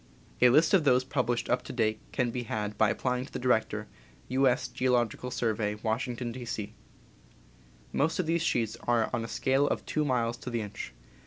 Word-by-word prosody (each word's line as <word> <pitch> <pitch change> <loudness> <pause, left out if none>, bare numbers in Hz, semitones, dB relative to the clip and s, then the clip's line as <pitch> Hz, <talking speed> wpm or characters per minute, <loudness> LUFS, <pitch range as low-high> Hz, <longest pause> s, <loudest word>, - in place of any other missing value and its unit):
A 125 - +8
list 155 +8 +4
of 190 -5 +5
those 130 -3 +4
published 125 -3 -1
up 125 - +1
to - - -8
date 110 -3 0
can 125 -2 0
be 125 - -3
had 105 -2 -3
by 105 0 +3
applying 125 +3 -1
to - - -17
the - - -4
Director, 110 -4 +1 0.4
U. 135 +1 +3
S. 125 0 +1
Geological 125 -1 0
Survey, 110 -4 -1
Washington, 120 +2 -2
D. 125 +1 -7
C. 110 -3 -4 1.2
Most 160 +4 +1
of 185 - 0
these 165 +1 +1
sheets 115 -8 0
are 120 -2 +2
on 120 -2 0
a - - -4
scale 135 +4 +1
of - - -2
two 155 - 0
miles 120 -4 0
to 125 - -7
the 120 -1 -1
inch. 100 - -7
125 Hz, 195 wpm, -29 LUFS, 115-130 Hz, 1.2 s, A